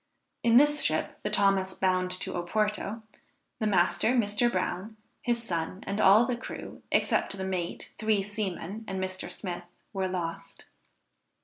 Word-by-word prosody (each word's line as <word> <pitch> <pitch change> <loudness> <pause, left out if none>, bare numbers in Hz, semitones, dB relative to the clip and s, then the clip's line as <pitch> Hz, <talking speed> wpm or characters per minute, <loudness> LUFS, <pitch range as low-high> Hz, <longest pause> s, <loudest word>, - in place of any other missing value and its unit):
In 235 0 +5
this 295 +2 +5
ship, 155 0 +1
the 210 - -2
Thomas, 195 -2 +2
bound 185 -1 +1
to 185 0 -1
Oporto, 210 +4 -1 0.6
the 215 - +1
master, 205 +5 +3
Mr. 230 +1 +2
Brown, 190 +3 -2 0.2
his 235 -1 0
son, 175 -2 -3
and 200 +2 -1
all 210 +5 +7
the 250 - -1
crew, 240 - -8
except 195 - +2
the 190 - -3
mate, 180 -3 -4
three 215 -2 +2
seamen 205 0 -4
and 190 0 -3
Mr. 185 0 -4
Smith, 175 -3 -5 0.3
were 190 -1 0
lost. 175 -3 -5
195 Hz, 145 wpm, -29 LUFS, 185-220 Hz, 0.6 s, all